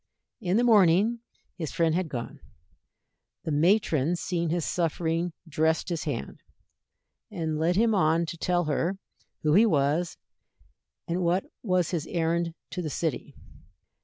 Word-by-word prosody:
In 190 -3 0
the 240 - +3
morning 210 0 +4 0.4
his 160 -4 -3
friend 165 -2 +1
had 175 -1 -1
gone. 120 -4 -6 1.0
The 160 - -3
matron 165 -1 +2
seeing 170 -1 -2
his 170 0 -1
suffering 165 0 -1 0.2
dressed 160 +3 +1
his 170 -3 -3
hand, - - -4 0.9
and 160 -7 -3
led 170 +3 +2
him 225 +2 +3
on 165 -3 +3
to 165 - -6
tell 175 +1 0
her 165 +5 -1 0.5
who 150 -1 +3
he 215 +6 +6
was 155 0 +1 0.9
and 175 +2 -1
what 180 +2 +1 0.2
was 185 -5 +1
his 165 -3 -2
errand 170 0 -1 0.2
to 180 - -3
the 160 - -3
city. 160 -1 -3
170 Hz, 140 wpm, -27 LUFS, 160-180 Hz, 1.0 s, he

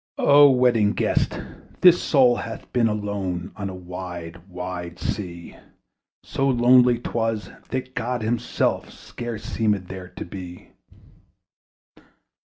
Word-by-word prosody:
O 145 0 +7
Wedding 120 -5 +3
Guest! - - 0 0.4
this 180 -1 +7
soul 130 -4 +4
hath 115 - -7
been 120 -2 +3
Alone 100 -4 -3
on 100 -1 -4
a 95 - -7
wide 90 -2 -8
wide 90 -1 -6
sea: 85 -5 -5 0.7
So 135 0 -1
lonely 125 -1 +5
'twas, 115 -4 -2 0.2
that 130 0 -4
God 120 -1 -2
himself 120 +2 -1
Scarce 120 -3 -7
seemed 105 -5 -1
there 95 -1 -7
to 90 - -8
be. 90 -1 -10
105 Hz, 115 wpm, -23 LUFS, 90-120 Hz, 0.7 s, O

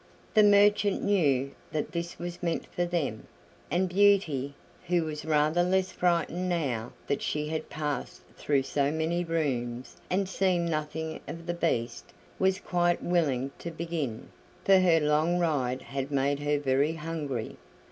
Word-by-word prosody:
The 215 - +6
merchant 205 0 +4
knew 140 -9 +2 0.2
that 155 - -2
this 170 0 -4
was 175 0 -6
meant 170 -2 -1
for 175 - 0
them, 160 -11 -2 0.4
and 185 +2 +1
Beauty, 175 -8 +3 0.3
who 175 -1 +2
was 155 -1 -5
rather 155 +2 +3
less 185 +1 +1
frightened 180 0 0
now 130 -10 -1
that 140 - -1
she 150 0 -2
had 160 0 -3
passed 150 -3 -4
through 140 -2 +1
so 140 +1 0
many 160 +3 0
rooms 130 -7 -2
and 190 +1 +1
seen 185 -2 +1
nothing 160 0 -3
of 165 0 -7
the 175 - -1
Beast, 120 -9 -2 0.3
was 190 0 +3
quite 175 -1 +1
willing 140 -7 +1
to 170 - -5
begin, 160 -8 -4 0.4
for 195 -1 +6
her 175 -3 +4
long 155 +3 +2
ride 135 -7 0
had 135 0 -4
made 140 0 +1
her 145 0 +1
very 140 +2 +1
hungry. 150 -7 -4
160 Hz, 150 wpm, -28 LUFS, 140-175 Hz, 0.4 s, The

